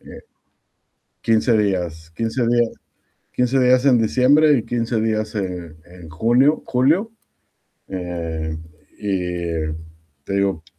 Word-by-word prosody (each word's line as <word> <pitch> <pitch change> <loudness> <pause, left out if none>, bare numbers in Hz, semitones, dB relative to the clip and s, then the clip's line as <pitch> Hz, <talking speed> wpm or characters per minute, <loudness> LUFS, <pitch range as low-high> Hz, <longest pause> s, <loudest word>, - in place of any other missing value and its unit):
Eh, - - -12 1.0
15 115 +1 +2
días 90 -6 -2
15 115 +5 -1
días 120 -1 +2 0.6
15 125 +2 0
días 125 0 +4
en 130 -3 +5
diciembre 130 +7 +4
y 110 - -4
15 115 -1 -1
días, 110 -1 -1
eh, 90 -5 -4
en 90 -1 -13
junio, 120 - +2
julio, 155 - +2 0.8
eh, 85 -4 -4 0.4
y 90 -5 -2 0.6
te - - -6
digo 100 -5 0
110 Hz, 110 wpm, -21 LUFS, 90-125 Hz, 1.0 s, en